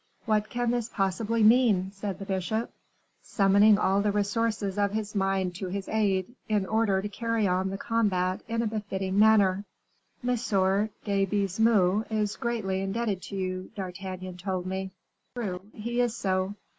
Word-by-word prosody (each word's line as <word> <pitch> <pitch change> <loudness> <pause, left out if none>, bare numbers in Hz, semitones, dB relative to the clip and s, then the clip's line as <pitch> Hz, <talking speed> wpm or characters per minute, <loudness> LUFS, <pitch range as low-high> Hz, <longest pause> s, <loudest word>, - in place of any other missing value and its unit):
"What 215 -2 +1
can 240 -1 0
this 240 -2 -1
possibly 215 +3 0
mean?" 215 -5 +4
said 195 -1 -5
the 195 - -7
bishop, 195 +4 -2 0.5
summoning 200 +1 +4
all 195 0 +2
the 205 0 +1
resources 205 -1 -1
of 200 0 +1
his 210 -1 -3
mind 195 -2 0
to 190 - -4
his 195 +1 -4
aid, 200 -4 +1 0.2
in 210 -3 +1
order 205 -2 +1
to - - -2
carry 230 0 -1
on 185 +1 +1
the 195 - -4
combat 195 -5 0
in 230 0 -1
a - - -1
befitting 200 -3 -2
manner. 205 -3 +5 0.6
"M. - - +2
de 200 -1 0
Baisemeaux 205 0 +2
is 210 -2 -1
greatly 210 -5 -2
indebted 195 0 -2
to 200 - -8
you, 185 -1 -3
D'Artagnan 185 -1 -6
told 185 0 -3
me." 190 +1 -3 0.5
"True, 190 -7 -3
he 235 +3 -2
is 240 -2 0
so." 190 +1 -1
200 Hz, 155 wpm, -28 LUFS, 190-220 Hz, 0.6 s, manner